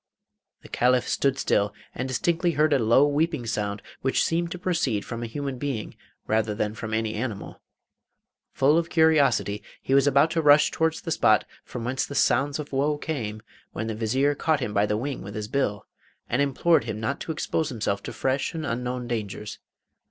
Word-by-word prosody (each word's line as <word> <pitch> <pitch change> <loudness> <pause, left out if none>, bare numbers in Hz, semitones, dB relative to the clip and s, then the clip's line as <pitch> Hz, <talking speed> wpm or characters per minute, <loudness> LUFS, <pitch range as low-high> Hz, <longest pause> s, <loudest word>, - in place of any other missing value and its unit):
The - - -11
Caliph 125 0 +2
stood 135 -1 +1
still 105 -4 +1 0.2
and 130 - -3
distinctly 170 +6 0
heard 150 +1 +3
a 140 - +3
low 120 +5 +5
weeping 150 -2 0
sound 105 -2 -3 0.2
which 135 - +2
seemed 170 +1 0
to 180 - -5
proceed 165 - -1
from 115 -1 -5
a 120 - -3
human 135 +1 -4
being 135 -6 -3 0.3
rather 110 -1 0
than 105 0 -1
from 110 0 -6
any 110 0 -1
animal. 110 -2 -5 0.9
Full 145 +5 +4
of 170 0 -3
curiosity 155 -10 +3 0.2
he 135 - -2
was 140 0 +5
about 140 +3 +4
to 165 -1 +1
rush 150 0 +6
towards 160 0 0
the 165 - -5
spot 110 -9 +3 0.2
from 120 - -7
whence 130 +2 -1
the 140 - -7
sounds 140 +3 +2
of 150 -2 -7
woe 145 +2 +1
came, 110 -9 -4 0.3
when 110 - -3
the 110 - -3
Vizier 130 +7 +1
caught 155 +1 +1
him 120 -6 -3
by 105 0 +2
the 105 - 0
wing 135 +4 -4
with 100 +1 -8
his 105 -1 -4
bill, 105 -5 -1 0.4
and 125 - +1
implored 140 0 +2
him 110 -2 -4
not 135 +6 -2
to - - -4
expose 160 0 -1
himself 105 -5 -2
to - - -6
fresh 130 +7 -1
and 160 -1 -3
unknown 125 -1 -3
dangers. 105 -3 -4
130 Hz, 195 wpm, -25 LUFS, 110-145 Hz, 0.9 s, rush